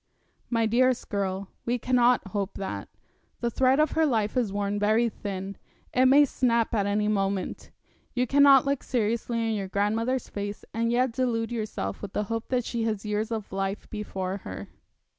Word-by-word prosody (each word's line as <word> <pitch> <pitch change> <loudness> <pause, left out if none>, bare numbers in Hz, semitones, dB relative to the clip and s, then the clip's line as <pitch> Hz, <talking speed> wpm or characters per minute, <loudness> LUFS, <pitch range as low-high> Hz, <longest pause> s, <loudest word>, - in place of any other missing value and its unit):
My 230 -2 +2
dearest 250 +3 +2
girl, 195 -1 -2
we 240 +1 0
cannot 245 -3 +2
hope 200 0 -3
that. 195 - -5 0.5
The 235 -1 -1
thread 260 +3 +3
of 305 -1 +3
her 320 - +2
life 225 -7 +1
is 240 -6 +1
worn 205 0 -1
very 220 +3 +3
thin. 195 -2 -6 0.4
It 255 +1 +5
may 285 +3 +7
snap 235 -3 +1
at 205 -3 +1
any 210 +1 +1
moment. 195 -2 -1 0.5
You 250 0 +2
cannot 280 +1 +6
look 280 -1 0
seriously 230 0 -1
in 225 - 0
your 200 -3 -2
grandmother's 220 +6 0
face, 205 0 -5
and 230 +1 0
yet 250 +1 +2
delude 235 -2 -1
yourself 215 - -4
with 200 -2 -7
the 210 - 0
hope 225 0 -3
that 250 -2 0
she 235 - -2
has 215 -2 -2
years 210 +1 -1
of 220 -4 -4
life 195 +1 -3
before 195 -3 -3
her.' 95 - -8
225 Hz, 180 wpm, -27 LUFS, 200-245 Hz, 0.5 s, may